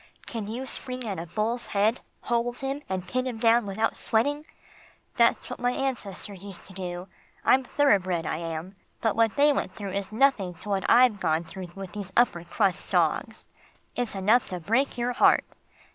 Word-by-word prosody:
Can 225 Hz, -4 st, -5 dB
you 240 Hz, +5 st, -4 dB
spring 255 Hz, -1 st, -4 dB
at 200 Hz, -6 st, -3 dB
a 170 Hz, -, -6 dB
bull's 215 Hz, +7 st, -1 dB
head, 215 Hz, +4 st, +3 dB, 0.2 s
hold 240 Hz, 0 st, -1 dB
him, 270 Hz, +2 st, -2 dB
and 185 Hz, -1 st, -3 dB
pin 255 Hz, +5 st, -1 dB
him 245 Hz, -3 st, -4 dB
down 230 Hz, -1 st, +4 dB
without 215 Hz, +3 st, 0 dB
sweating? 290 Hz, +7 st, 0 dB, 0.7 s
That's -, -, +3 dB
what -, -, -7 dB
my 245 Hz, 0 st, +1 dB
ancestors 205 Hz, -8 st, -4 dB
used 200 Hz, -3 st, -9 dB
to 190 Hz, -, -12 dB
do. 180 Hz, -1 st, -5 dB, 0.4 s
I'm 265 Hz, -, +5 dB
thoroughbred 190 Hz, -, +2 dB
I -, -, -1 dB
am. 165 Hz, +3 st, -5 dB, 0.2 s
But 225 Hz, -3 st, +1 dB
what 225 Hz, -2 st, +2 dB
they 290 Hz, +1 st, +5 dB
went 230 Hz, -, -2 dB
through 200 Hz, -2 st, -5 dB
is 200 Hz, +1 st, -3 dB
nothing 215 Hz, -7 st, +2 dB
to 205 Hz, -, -10 dB
what 195 Hz, -2 st, 0 dB
I've 240 Hz, -3 st, +6 dB
gone 160 Hz, -2 st, +1 dB
through 185 Hz, +2 st, -8 dB
with 195 Hz, -2 st, -7 dB
these 200 Hz, -3 st, -6 dB
upper 205 Hz, -8 st, +3 dB
crust 195 Hz, +1 st, 0 dB
dogs. -, -, 0 dB, 0.5 s
It's 245 Hz, -4 st, -2 dB
enough 210 Hz, +6 st, +3 dB
to 180 Hz, -1 st, -4 dB
break 230 Hz, -, +1 dB
your 245 Hz, +1 st, 0 dB
heart. -, -, +5 dB
215 Hz, 185 wpm, -27 LUFS, 190-245 Hz, 0.7 s, I've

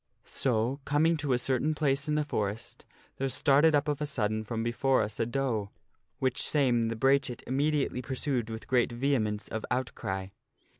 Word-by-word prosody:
So, 125 Hz, +1 st, 0 dB
coming 155 Hz, +4 st, +2 dB
to 145 Hz, -3 st, -2 dB
a 125 Hz, -, +4 dB
certain 135 Hz, +5 st, 0 dB
place 140 Hz, -1 st, +1 dB
in 150 Hz, -, +1 dB
the 150 Hz, 0 st, +1 dB
forest, 110 Hz, -3 st, -4 dB, 0.3 s
there 135 Hz, 0 st, -1 dB
started 145 Hz, +4 st, +4 dB
up 145 Hz, +1 st, +1 dB
of 150 Hz, -1 st, -1 dB
a 150 Hz, -, -1 dB
sudden 110 Hz, -5 st, -1 dB
from 115 Hz, +1 st, -3 dB
before 130 Hz, +1 st, +2 dB
us 105 Hz, 0 st, -5 dB
a 115 Hz, -, +1 dB
doe, 120 Hz, -6 st, -1 dB, 0.5 s
which 130 Hz, 0 st, 0 dB
same 125 Hz, -6 st, +3 dB
the 115 Hz, -, -2 dB
brachet 135 Hz, +1 st, +1 dB
immediately 140 Hz, -1 st, 0 dB
pursued 130 Hz, -2 st, -2 dB
with 110 Hz, 0 st, -6 dB
great 125 Hz, -2 st, +2 dB
vehemence 120 Hz, -4 st, 0 dB
of 110 Hz, -, -4 dB
outcry. 95 Hz, -6 st, -3 dB
130 Hz, 170 wpm, -29 LUFS, 115-140 Hz, 0.5 s, a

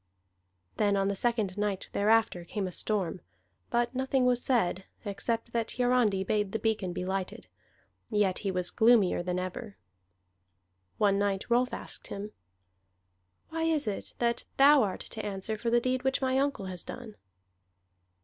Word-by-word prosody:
Then 205 Hz, -1 st, +2 dB
on 195 Hz, 0 st, +1 dB
the 200 Hz, -, -1 dB
second 210 Hz, -3 st, 0 dB
night 205 Hz, -2 st, -1 dB
thereafter 215 Hz, -3 st, +2 dB
came 195 Hz, +3 st, -3 dB
a 185 Hz, -, -4 dB
storm; 185 Hz, -2 st, -1 dB, 0.5 s
but 240 Hz, +1 st, +1 dB
nothing 265 Hz, 0 st, +1 dB
was 250 Hz, -1 st, +3 dB
said, 190 Hz, -7 st, +1 dB, 0.2 s
except 225 Hz, +3 st, -2 dB
that 230 Hz, -1 st, -1 dB
Hiarandi 245 Hz, -6 st, +2 dB
bade 205 Hz, 0 st, 0 dB
the -, -, +1 dB
beacon 220 Hz, -5 st, -1 dB
be 180 Hz, +1 st, -4 dB
lighted. 190 Hz, 0 st, -3 dB, 0.6 s
Yet 205 Hz, -4 st, +1 dB
he 200 Hz, -, -2 dB
was 180 Hz, -1 st, -1 dB
gloomier 220 Hz, -6 st, +4 dB
than 180 Hz, 0 st, -2 dB
ever. 190 Hz, +4 st, -5 dB, 1.2 s
One 200 Hz, -1 st, +3 dB
night 200 Hz, -1 st, 0 dB
Rolf 250 Hz, +1 st, +3 dB
asked -, -, -6 dB
him: 205 Hz, +1 st, -6 dB, 1.2 s
"Why 325 Hz, 0 st, -3 dB
is 315 Hz, -4 st, +1 dB
it 210 Hz, -2 st, -4 dB
that 235 Hz, -1 st, 0 dB
thou 280 Hz, +1 st, +7 dB
art 195 Hz, -5 st, -1 dB
to 220 Hz, -, -6 dB
answer 200 Hz, +2 st, -3 dB
for 230 Hz, +2 st, -2 dB
that 240 Hz, 0 st, +3 dB
deed 255 Hz, 0 st, 0 dB
which 265 Hz, 0 st, +1 dB
my 260 Hz, -1 st, +1 dB
uncle 275 Hz, -8 st, -1 dB
has 185 Hz, -2 st, -3 dB
done?" 215 Hz, -, -8 dB
210 Hz, 160 wpm, -29 LUFS, 195-240 Hz, 1.2 s, thou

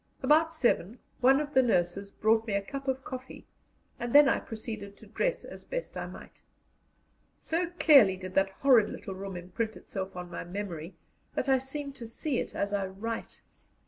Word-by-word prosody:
About 315 Hz, +2 st, +4 dB
seven 240 Hz, -, +1 dB, 0.2 s
one 265 Hz, +2 st, +5 dB
of 300 Hz, 0 st, -4 dB
the 260 Hz, -, +6 dB
nurses 195 Hz, -4 st, +1 dB
brought 220 Hz, +2 st, +2 dB
me 205 Hz, -, 0 dB
a 200 Hz, -, +1 dB
cup 275 Hz, +6 st, -7 dB
of 265 Hz, 0 st, -1 dB
coffee, 260 Hz, 0 st, -8 dB, 0.5 s
and 240 Hz, 0 st, -3 dB
then 290 Hz, 0 st, +9 dB
I -, -, +3 dB
proceeded 215 Hz, -3 st, -7 dB
to -, -, -14 dB
dress 485 Hz, -, -1 dB
as -, -, -10 dB
best -, -, -5 dB
I -, -, -4 dB
might. -, -, -12 dB, 1.0 s
So 335 Hz, +1 st, -1 dB
clearly 250 Hz, -, +7 dB
did 185 Hz, 0 st, -8 dB
that 195 Hz, 0 st, +3 dB
horrid 230 Hz, +1 st, +4 dB
little 195 Hz, -, -6 dB
room 195 Hz, -1 st, -6 dB
imprint 190 Hz, +6 st, -4 dB
itself 190 Hz, -2 st, -6 dB
on 180 Hz, -1 st, -7 dB
my -, -, -5 dB
memory 175 Hz, -2 st, -6 dB, 0.4 s
that -, -, -1 dB
I 265 Hz, -1 st, +4 dB
seem 280 Hz, +2 st, -6 dB
to 245 Hz, -4 st, -8 dB
see 250 Hz, +3 st, -2 dB
it -, -, -5 dB
as 200 Hz, 0 st, -1 dB
I 200 Hz, -1 st, 0 dB
write. 220 Hz, +4 st, -6 dB
225 Hz, 185 wpm, -29 LUFS, 195-270 Hz, 1.0 s, then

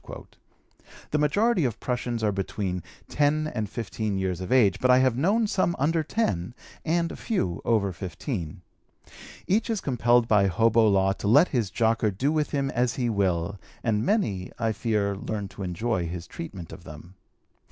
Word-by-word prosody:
The 150 Hz, -, +1 dB
majority 200 Hz, -, +2 dB
of 120 Hz, -4 st, -1 dB
prushuns 120 Hz, -2 st, -2 dB
are 105 Hz, -, +2 dB
between 95 Hz, -2 st, -3 dB, 0.3 s
10 150 Hz, +1 st, +1 dB
and 110 Hz, -4 st, -2 dB
15 105 Hz, -2 st, -3 dB
years 95 Hz, -2 st, -2 dB
of 90 Hz, -, -5 dB
age, 105 Hz, -7 st, +4 dB
but 130 Hz, -, +1 dB
I 125 Hz, -, +7 dB
have 130 Hz, -2 st, +3 dB
known 200 Hz, -, +2 dB
some 185 Hz, -4 st, 0 dB
under 160 Hz, +4 st, +1 dB
10 125 Hz, -, -2 dB, 0.3 s
and 170 Hz, +1 st, 0 dB
a -, -, -7 dB
few 95 Hz, -, -2 dB
over 100 Hz, -5 st, +1 dB
15. 90 Hz, -, -5 dB, 0.8 s
Each 215 Hz, +5 st, +1 dB
is 225 Hz, -3 st, 0 dB
compelled 120 Hz, -4 st, +2 dB
by 100 Hz, -3 st, +4 dB
hobo 115 Hz, +3 st, +3 dB
law 95 Hz, -1 st, +3 dB
to 100 Hz, -, -5 dB
let 120 Hz, -, +6 dB
his 115 Hz, -7 st, 0 dB
jocker 110 Hz, 0 st, +1 dB
do 125 Hz, +9 st, 0 dB
with 155 Hz, -1 st, 0 dB
him 140 Hz, -2 st, -1 dB
as 120 Hz, 0 st, 0 dB
he 120 Hz, -3 st, 0 dB
will, 95 Hz, -1 st, 0 dB, 0.2 s
and 110 Hz, -2 st, +1 dB
many, 105 Hz, -, 0 dB
I 115 Hz, -1 st, 0 dB
fear, 105 Hz, -2 st, 0 dB
learn 100 Hz, 0 st, -4 dB
to 100 Hz, -, -11 dB
enjoy 90 Hz, 0 st, -1 dB
his 85 Hz, 0 st, -6 dB
treatment 85 Hz, 0 st, -8 dB
of -, -, -11 dB
them. 75 Hz, +4 st, -11 dB
110 Hz, 175 wpm, -26 LUFS, 95-135 Hz, 0.8 s, I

